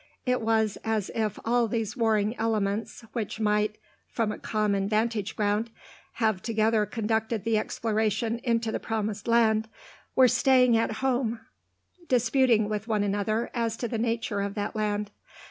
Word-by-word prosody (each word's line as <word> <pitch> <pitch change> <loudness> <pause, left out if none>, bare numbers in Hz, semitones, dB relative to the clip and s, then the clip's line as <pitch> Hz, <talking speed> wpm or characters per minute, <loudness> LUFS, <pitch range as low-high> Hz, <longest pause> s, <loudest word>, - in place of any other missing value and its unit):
It 250 -1 +1
was 220 -2 +1
as 220 -3 -1
if 215 -2 -1
all 235 0 +2
these 220 -1 -2
warring 220 -2 +1
elements, 220 0 -1
which 220 -2 -3
might, 210 0 +1 0.3
from 225 -3 -1
a - - -6
common 205 -2 0
vantage 215 -1 0
ground, 210 +2 0 0.4
have 220 -5 0
together 220 -1 +1
conducted 220 0 -1
the 225 -1 +2
exploration 220 +1 -1
into 230 -2 0
the - - -2
promised 215 -1 -3
land, 220 -2 +3 0.5
were 260 -1 +7
staying 250 -1 +4
at 225 0 +1
home 245 -3 0 0.7
disputing 240 -2 +3
with 210 +1 -3
one 215 -3 +1
another 205 +3 -1
as 230 -2 -1
to 240 - -2
the 230 -1 -3
nature 230 -3 -1
of 200 0 -3
that 205 +1 -3
land. 210 -1 -1
220 Hz, 150 wpm, -27 LUFS, 210-230 Hz, 0.7 s, were